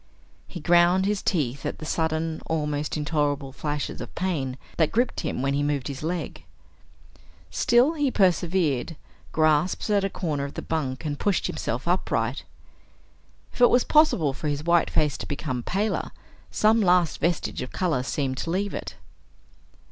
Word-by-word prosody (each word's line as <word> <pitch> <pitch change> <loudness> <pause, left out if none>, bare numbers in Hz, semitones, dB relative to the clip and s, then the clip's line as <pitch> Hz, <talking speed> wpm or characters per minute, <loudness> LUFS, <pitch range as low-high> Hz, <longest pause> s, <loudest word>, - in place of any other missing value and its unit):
He 180 - -8
ground 175 +3 +4
his 205 0 0
teeth 140 - -1
at - - -3
the 155 - -8
sudden, 160 0 -1
almost 150 -1 -1
intolerable 145 -2 -1
flashes 145 +1 -4
of - - -9
pain 145 -9 -2 0.2
that 160 -3 +2
gripped 240 +2 +1
him 125 - -3
when 135 0 +1
he 140 - +1
moved 145 -2 -1
his 140 -2 -6
leg. 170 +2 -4 1.1
Still 245 +6 +3
he 290 -4 +1
persevered, 175 - +1 0.4
grasped 155 +2 +2
at 200 -1 +3
a 195 - 0
corner 150 -7 -2
of 140 - -8
the - - -5
bunk 145 -3 -3
and 145 -1 -3
pushed 200 -2 +1
himself - - -3
upright. - - 0 1.1
If - - -7
it 245 - +8
was 245 - +4
possible 250 - +3
for 150 - -5
his 145 0 -2
white 170 +1 +3
face 150 -2 +1
to - - -7
become 140 -3 -3
paler, 200 - -1 0.4
some 220 +1 +3
last 180 -5 +3
vestige 170 +2 -1
of 125 - -6
color 165 -9 0
seemed 130 0 -2
to 165 - -3
leave 195 +4 -1
it. - - -6
160 Hz, 165 wpm, -25 LUFS, 145-185 Hz, 1.1 s, it